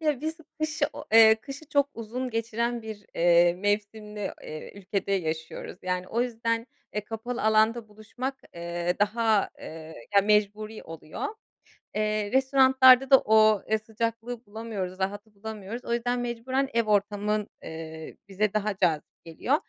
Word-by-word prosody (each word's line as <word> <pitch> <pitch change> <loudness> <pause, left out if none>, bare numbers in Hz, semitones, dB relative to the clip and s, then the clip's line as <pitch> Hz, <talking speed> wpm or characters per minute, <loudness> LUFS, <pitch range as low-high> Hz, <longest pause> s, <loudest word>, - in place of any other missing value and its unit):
Ya, 300 -5 0
biz 315 +2 -3 0.2
kışı 310 -1 +1
o - - -8
eee, 220 -1 +9
kışı 275 +7 -10
çok 285 -1 +2
uzun 245 +3 -4
geçiren 230 +1 -1
bir, 215 -2 -8
eee, 175 0 +5
mevsimli, 205 +1 -2
eee, 155 0 -8
ülkede 200 0 -3
yaşıyoruz. 160 -1 -3
Yani, 180 0 -2
o 235 - 0
yüzden, 230 -1 -1 0.3
eee, 210 - 0
kapalı 230 +3 -5
alanda 220 +1 +3
buluşmak, 230 +6 -6 0.2
eee, 170 +1 -2
daha, 215 0 +2
eee, 160 0 -9 0.2
ya, 200 - +7
mecburi 210 +1 +1
oluyor. 160 -1 -6 0.7
Eee, 215 -1 0
restoranlarda 265 -1 +6
da 270 - +9
o, 215 -1 +4
ııı, 220 0 +2
sıcaklığı 230 +2 -4
bulamıyoruz, 205 -4 -5
rahatı 205 +3 -3
bulamıyoruz. 220 +2 -7
O 235 - -1
yüzden 245 +1 0
mecburen 245 +3 -1
ev 230 - +3
ortamın, 210 0 0
eee, 160 0 -8
bize 200 +1 0
daha 210 -1 0
cazip 160 -5 -1
geliyor. 170 - 0
215 Hz, 145 wpm, -27 LUFS, 200-235 Hz, 0.7 s, eee